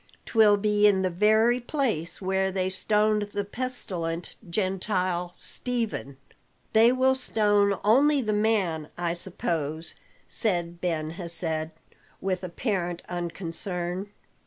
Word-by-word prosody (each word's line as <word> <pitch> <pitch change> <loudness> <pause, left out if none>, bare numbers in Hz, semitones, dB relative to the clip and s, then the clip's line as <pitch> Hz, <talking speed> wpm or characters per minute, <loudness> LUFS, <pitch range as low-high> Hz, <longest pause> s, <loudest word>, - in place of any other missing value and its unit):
'Twill 215 -3 +5
be 210 0 +3
in 190 -2 +3
the 185 - +1
very 220 +6 +4
place 240 - -2
where 190 0 0
they 185 0 -1
stoned 210 +2 +2
the 205 - -1
pestilent 185 -8 -3 0.2
Gentile, 185 -2 0
Stephen." 225 - -3 0.6
"They 225 +2 +6
will 260 +1 +3
stone 205 -5 +2
only 280 +7 +5
the 215 -5 0
man, 200 -8 +1
I 175 -1 -1
suppose?" 165 -3 -2 0.3
said 175 -5 -1
Ben 160 -3 -1
Hesed 165 -2 -2 0.5
with 190 -1 -2
apparent 175 -2 -2
unconcern. 175 +2 -3
190 Hz, 110 wpm, -27 LUFS, 175-215 Hz, 0.6 s, They